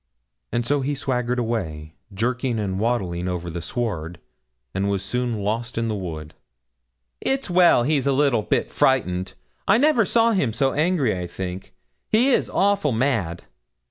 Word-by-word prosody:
And 120 0 -1
so 145 +3 +1
he 145 +2 -1
swaggered 125 -2 -1
away, 80 -11 -3 0.2
jerking 120 +4 -1
and 95 -3 -2
waddling 95 -6 -1
over 90 -1 -3
the 85 +1 -5
sward, 85 -5 -3 0.5
and 95 +1 0
was 100 -1 -1
soon 120 -1 -2
lost 115 +3 -2
in 115 0 0
the 110 - -1
wood. 80 -6 -6 0.9
'It's 270 -7 -1
well 175 -8 +5
he's 140 0 +1
a - - +4
little 135 -4 +3
bit - - -1
frightened 95 -8 +1 0.3
I - - +5
never 280 -3 +4
saw 230 +3 +3
him 145 - +1
so 135 +2 +1
angry, 150 - +1
I 90 -1 -4
think; 95 +1 -6 0.3
he 245 +5 +4
is - - +2
awful 200 -6 +2
mad.' 110 -9 0
115 Hz, 160 wpm, -23 LUFS, 95-140 Hz, 0.9 s, well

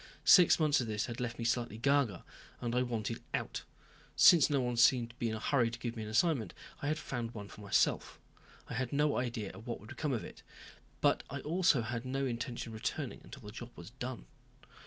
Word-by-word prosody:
Six 180 -3 +7
months 150 -3 +3
of 120 - -3
this 105 0 -1
had 120 -1 -6 0.2
me 115 - -4
slightly 120 -2 0
ga 140 +4 +3
ga 100 -7 -9 0.4
and 120 -1 -3
I 125 - +2
wanted 115 -2 -3
out. - - -3 0.5
Since 160 -4 +7
no 140 -2 +2
one 125 -1 -1
seemed 120 0 +4
to - - -24
be 120 - -1
in 110 - -2
a - - -5
hurry 120 0 +2
to 115 - -7
give 115 0 -4
me 110 - -5
an 105 - -5
assignment 115 - +1 0.3
I 145 - -2
had 155 +1 0
found 120 -6 -5
one 100 -2 -7
for - - -12
myself. 100 - +1 0.5
I - - -6
had 125 +1 -2
no 150 +1 +2
idea 115 -5 -3
of 115 +2 -12
what 120 - -3
would 105 - -11
come 145 -4 0
if 115 - -4
it, - - -10 0.6
but - - +3
I 140 +1 -5
also 160 -5 +2
had 115 +1 -4
no 135 +1 -2
intention 120 -1 -4
of - - -9
returning 140 -6 -3
until 135 - -12
the 105 - -8
job 120 +2 -8
was 85 +5 -10
done. 125 0 -6
120 Hz, 225 wpm, -33 LUFS, 115-135 Hz, 0.6 s, Six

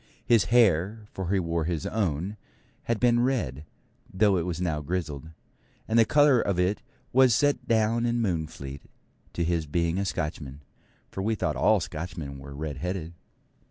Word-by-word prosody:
His 115 -4 +4
hair, 105 -2 +3
for 95 -2 -5
he 100 - +3
wore 85 -2 -1
his 80 -3 -2
own, 95 -2 -1 0.5
had 115 -2 0
been 120 -1 +4
red, 90 - -1 0.5
though 100 +1 +3
it 85 0 -1
was 85 -2 -3
now 80 -4 -1
grizzled; 80 -2 -4 0.6
and 115 +1 +3
the 115 - +6
colour 145 -2 +5
of 95 -3 -1
it 90 +3 +1 0.3
was 130 -2 +5
set 145 +2 +1
down 115 +1 +2
in 120 0 0
Moonfleet 80 -9 -3 0.5
to 85 - -1
his 85 -2 -1
being 85 +3 0
a 100 - -1
Scotchman, 75 -5 -4 0.5
for 95 - -4
we 110 +3 0
thought - - -1
all - - +4
Scotchmen 75 -4 -6
were 70 +1 -10
red 75 -1 -5
headed. 90 0 -4
90 Hz, 165 wpm, -27 LUFS, 80-110 Hz, 0.6 s, the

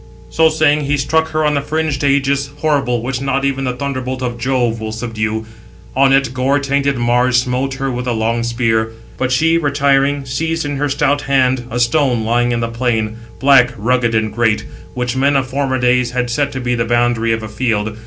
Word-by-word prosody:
So 160 0 +4
saying, 150 -2 +2
he 145 +1 0
struck 160 +4 +1
[her] 155 0 -1
on 150 - +2
the 140 - 0
fringed 155 -1 -2
ægis, 140 0 +1
horrible, 140 -6 0
which 125 0 -3
not 135 0 0
even 135 -1 -1
the 125 - -1
thunderbolt 130 -1 -4
of 120 -1 -3
Jove 120 -2 0
will 110 0 -4
subdue; 110 -1 -3 0.5
on 135 +1 +4
it 135 -2 +2
gore 130 +2 +1
tainted 140 -1 0
Mars 120 +1 +2
smote 130 +2 -2
her 135 0 -2
with 125 0 -4
the 125 - 0
long 115 +1 0
spear. 115 -1 0 0.3
But 130 0 0
she, 165 +6 +3
retiring, 140 -1 +1
seized 160 +5 -2
in 145 -1 -3
her 145 +1 -1
stout 145 0 +1
hand 130 -2 +2
a 120 - -3
stone 120 -1 +2
lying 120 +2 +1
in 120 0 -1
the 115 - -1
plain, 115 -2 -1 0.2
black, 135 -3 +4
rugged, 120 +1 +1
and 110 -1 0
great, 110 -2 +1 0.3
which 125 0 -2
men 140 +2 +2
of 135 -1 +2
former 130 0 -1
days 125 0 +2
had 125 -1 -2
set 140 +3 0
to 130 - -4
be 125 -1 -1
the 115 -1 0
boundary 120 -1 +1
of 110 0 -1
a - - -5
field. 110 -1 -2
130 Hz, 205 wpm, -16 LUFS, 120-140 Hz, 0.5 s, So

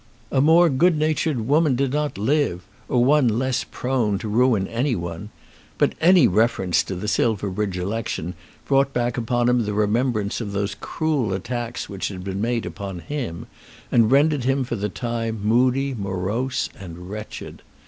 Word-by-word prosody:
A 135 - +3
more 165 +4 +6
good 160 +4 +3
natured 155 -3 0
woman 150 -1 +3
did 135 +1 0
not 150 -4 -1
live; 110 - 0 0.3
or 120 -1 +3
one 145 -1 +4
less 130 0 0
prone 125 -6 -1
to 110 - -6
ruin 110 -3 +2
any 125 +3 0
one. 85 +3 -5 0.5
But - - +2
any 175 -4 +6
reference 95 -3 +2
to 95 - -4
the 95 +4 -5
Silverbridge 105 -3 0
election 90 -2 -3 0.3
brought 135 0 +2
back 120 -1 0
upon 120 0 0
him 125 -1 +3
the 105 -1 -3
remembrance 105 0 0
of 100 -3 -5
the 100 +1 -1
cruel 145 - -1
attacks 120 +5 -4
which 100 -2 -4
had 90 -2 -7
been 95 +1 -4
made 115 0 -1
upon 100 -3 -6
him, 115 - -5 0.5
and 115 -2 +4
rendered 145 +1 +3
him 135 +1 +1
for 120 -1 -3
the 105 -1 -2
time 115 0 -3
moody, 130 +5 +2
morose, 100 +5 -2
and 90 -1 -9
wretched. 105 +1 -8
120 Hz, 165 wpm, -23 LUFS, 100-135 Hz, 0.5 s, more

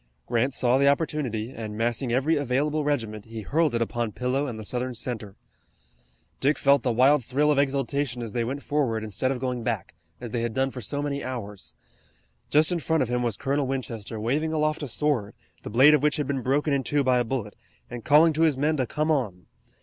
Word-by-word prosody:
Grant 120 +3 +1
saw 125 +1 +2
the 140 - +4
opportunity, 140 -6 0
and 110 -4 -6
massing 120 +2 -1
every 135 +7 +2
available 145 +2 0
regiment, 115 -8 -2
he 115 -1 -7
hurled 150 - +1
it 115 - +2
upon 115 -1 -3
Pillow 130 +3 -1
and 120 -4 -5
the 110 - -8
Southern 125 +2 -3
center. 110 -4 -5 1.0
Dick 140 +1 +2
felt 140 -1 +4
the 125 - 0
wild 130 +4 +4
thrill 145 +6 +1
of 145 - +2
exultation 135 -2 -1
as 115 - -7
they 120 - 0
went 135 +4 -4
forward 125 -7 0
instead 110 +4 -1
of 135 - -1
going 125 -1 -2
back, 115 -6 -3 0.3
as 120 -2 -7
they 120 - -1
had 115 -1 -3
done 135 0 +1
for 125 - -7
so 145 +7 -2
many 140 -1 -3
hours. 105 -6 -6 0.7
Just 155 +4 +4
in 175 - 0
front 160 -2 +1
of 120 - -4
him 125 0 0
was 120 -4 -1
Colonel 140 0 -1
Winchester, 115 -5 -4
waving 145 +9 0
aloft 155 0 0
a 145 - -3
sword, 125 -5 -1 0.3
the - - -7
blade 130 +8 +6
of 150 - +4
which 150 +1 +2
had 150 - -1
been 135 -1 -2
broken 140 +4 +1
in 135 -1 +1
two 145 +2 +1
by 130 -1 +3
a - - +2
bullet, 115 -4 -4 0.3
and 120 -2 -8
calling 155 +3 +5
to 155 - -1
his 155 -5 +3
men 150 +3 +1
to 130 -3 0
come 155 +4 0
on. 105 - -1
130 Hz, 220 wpm, -26 LUFS, 115-145 Hz, 1.0 s, blade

